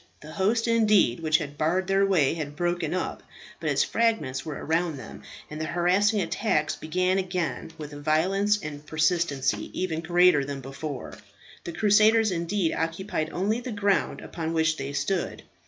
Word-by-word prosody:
The 155 - -10
host, 220 +7 +1
indeed, 215 - +3
which 155 -1 +3
had 145 -3 -7
barred 175 +5 +1
their 195 +1 +2
way 175 -9 +3
had 150 -3 -5
broken 175 -1 -1
up; 185 - -3 0.4
but - - -2
its - - +3
fragments 220 - 0
were 155 -3 -5
around 165 0 -1
them, 130 - -10 0.3
and 155 +1 -7
the - - -1
harassing 185 +6 +2
attacks 165 -3 0
began 185 +4 0
again 180 -6 -3
with 150 -2 -8
a 145 - -8
violence 190 +7 +2
and 145 -1 -7
persistency 155 -3 0
even 165 -3 -1
greater 175 -3 +4
than 140 0 -5
before. 135 +1 -7 0.5
The 170 - -5
crusaders, 215 +2 +4
indeed, 170 0 0
occupied 165 -1 -2
only 205 +6 0
the 245 0 -6
ground 200 -8 0
upon 165 -1 -4
which 160 -1 +2
they 135 0 -4
stood. 185 +5 -2
170 Hz, 165 wpm, -26 LUFS, 155-195 Hz, 0.5 s, greater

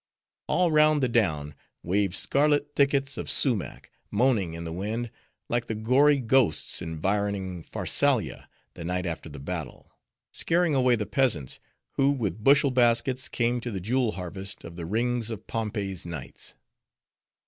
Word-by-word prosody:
All 180 -2 +2
round 155 -1 +4
the - - +4
down, 80 -12 0 0.3
waved 95 +1 +1
scarlet 145 +4 +2
thickets 140 0 +2
of - - -4
sumach, 120 -9 +1 0.2
moaning 105 -7 +1
in 85 - -6
the 80 - -5
wind, 110 +6 -3 0.4
like 120 0 0
the 110 - -3
gory 130 +7 +4
ghosts 125 - +1
environing 95 +2 -2
Pharsalia - - 0 0.2
the - - -8
night 90 +1 -2
after 85 -2 -5
the 70 - -10
battle; 75 -1 -6 0.4
scaring 170 -1 +1
away 130 -2 +4
the 105 -2 -3
peasants, 100 - 0 0.4
who 135 0 +4
with 110 -8 -2
bushel 140 +1 +5
baskets 125 +1 +2
came 120 0 0
to 120 - -4
the 100 -4 -4
jewel 115 +4 0
harvest 95 +1 -6
of 85 0 -9
the 85 -2 -6
rings 120 +3 0
of 110 -2 -6
Pompey's 105 -5 -3
knights. 85 -2 -7
110 Hz, 150 wpm, -26 LUFS, 90-130 Hz, 0.4 s, bushel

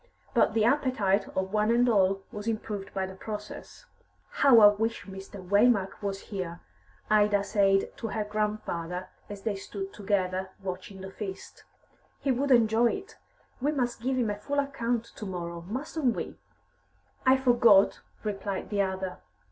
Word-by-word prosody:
But 230 -3 +3
the 220 -1 +3
appetite 230 -7 +2
of 190 +1 -2
one 215 0 +2
and 240 +1 +4
all 195 -3 +3
was 210 -1 -7
improved 210 -3 -3
by 190 -1 -2
the 190 - -8
process. 210 - -8 0.5
"How 265 -5 +6
I 205 - +11
wish 225 +2 -2
Mr. 195 -1 -10
Waymark 200 -1 +3
was 195 -1 -3
here!" 180 -4 -5 0.5
Ida 205 -1 +4
said 195 -1 +2
to 225 - -4
her 215 0 -2
grandfather, 210 -4 -3 0.2
as 205 -1 -8
they 220 - 0
stood 195 0 -6
together, 190 -2 -1
watching 190 +1 -6
the 190 0 -7
feast. 195 -1 -8 0.5
"He 275 - 0
would 270 +3 0
enjoy 235 -1 +4
it. - - -8 0.4
We 290 +3 +2
must 245 -5 -1
give 260 +2 0
him 230 -4 +1
a 205 - -5
full 285 +7 -3
account 245 -5 0
to 215 - -6
morrow, 170 -2 -5
mustn't 265 +1 -1
we?" - - -6 0.8
"I 260 +1 +5
forgot," 235 -6 +5 0.2
replied 200 -2 -4
the 205 -1 +2
other. 190 -1 -3
210 Hz, 155 wpm, -28 LUFS, 195-235 Hz, 0.8 s, I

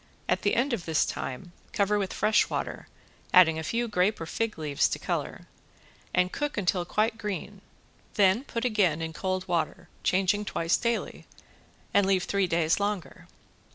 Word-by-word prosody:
At 185 +1 +1
the 205 - +1
end 255 +2 +1
of 210 -7 -3
this 160 -2 +2
time 135 +7 -5 0.2
cover 205 +1 +2
with 195 -2 -2
fresh 215 +1 +2
water, - - -4 0.5
adding 165 -3 +6
a - - -4
few 235 +8 -1
grape 205 0 +1
or 165 - -4
fig 225 +6 -2
leaves 150 -3 +1
to - - -2
color, - - -4 0.7
and 180 0 +2
cook 295 -3 -3
until 180 -2 +1
quite 220 +4 0
green. 205 -1 -5 0.5
Then 200 +3 +4
put 230 -3 -4
again 190 -9 +2
in 160 0 -4
cold 185 +1 -2
water, 170 -3 -2
changing 195 +3 +2
twice 165 -3 +1
daily, 235 0 -2 0.7
and 200 -1 +4
leave 190 -2 +2
three 200 -2 0
days 165 0 +1
longer. 200 -3 -3
190 Hz, 165 wpm, -28 LUFS, 175-210 Hz, 0.7 s, adding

